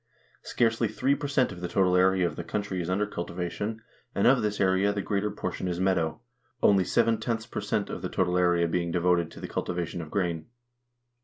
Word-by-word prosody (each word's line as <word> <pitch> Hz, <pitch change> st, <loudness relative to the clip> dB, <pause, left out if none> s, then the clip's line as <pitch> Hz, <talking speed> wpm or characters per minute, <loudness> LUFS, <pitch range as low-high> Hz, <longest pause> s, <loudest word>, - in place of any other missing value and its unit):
Scarcely 115 Hz, -1 st, +1 dB
3 125 Hz, +6 st, +1 dB
per 145 Hz, +1 st, -3 dB
cent 135 Hz, -4 st, +2 dB
of 90 Hz, -1 st, -9 dB
the 90 Hz, -, -2 dB
total 90 Hz, +1 st, +2 dB
area 95 Hz, 0 st, +4 dB
of 85 Hz, -3 st, -2 dB
the 85 Hz, -, -5 dB
country 100 Hz, 0 st, -3 dB
is 85 Hz, -, -4 dB
under 100 Hz, +3 st, +1 dB
cultivation, 95 Hz, +4 st, -4 dB, 0.3 s
and 100 Hz, -, +2 dB
of 130 Hz, +1 st, +5 dB
this 105 Hz, -1 st, -1 dB
area 95 Hz, +1 st, +3 dB
the 100 Hz, -1 st, -3 dB
greater 105 Hz, +1 st, 0 dB
portion 95 Hz, -, -4 dB
is 90 Hz, -1 st, -2 dB
meadow; 85 Hz, -4 st, +1 dB, 0.4 s
only 100 Hz, -2 st, +5 dB
^ 115 Hz, +3 st, 0 dB
per -, -, -3 dB
cent -, -, -1 dB
of -, -, -5 dB
the -, -, -3 dB
total 90 Hz, -1 st, 0 dB
area 90 Hz, -1 st, +3 dB
being 85 Hz, +1 st, -1 dB
devoted 85 Hz, -1 st, +2 dB
to -, -, -12 dB
the -, -, -6 dB
cultivation 90 Hz, 0 st, -3 dB
of 80 Hz, -, -8 dB
grain. 85 Hz, -4 st, -2 dB
95 Hz, 205 wpm, -27 LUFS, 85-105 Hz, 0.4 s, of